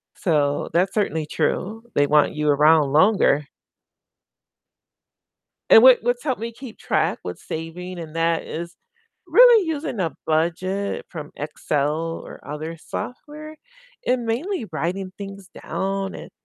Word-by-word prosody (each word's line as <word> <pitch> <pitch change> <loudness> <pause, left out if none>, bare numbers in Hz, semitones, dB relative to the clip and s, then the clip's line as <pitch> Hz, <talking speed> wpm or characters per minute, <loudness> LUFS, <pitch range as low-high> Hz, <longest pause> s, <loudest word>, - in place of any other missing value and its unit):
So 145 -4 0
that's 180 +3 +2
certainly 160 -7 0
true, 220 +8 -2
they 145 0 +3
want 150 0 +3
you 150 0 -1
around 150 0 +4
longer. 155 -4 +4 2.2
And 225 - +9
what 255 -1 +8
what's 245 +3 -1
helped 260 -6 -1
me 230 +1 -4
keep 250 -1 -11
track - - 0
with 90 0 -6
saving 175 +3 -7
and 165 -1 -8
that 165 0 +1
is 170 +2 -6 0.5
really 475 -6 +7
using 295 -8 -3
a 165 -3 -1
budget 180 +5 -1
from 155 -4 -8
Excel 150 +2 -2
or - - -11
other 155 +3 -5
software, 305 - -8 0.5
and 245 -1 +1
mainly 255 - -2
writing 185 +4 -3
things 195 -2 -9
down, 195 0 -3
and - - -9
180 Hz, 130 wpm, -22 LUFS, 155-225 Hz, 2.2 s, And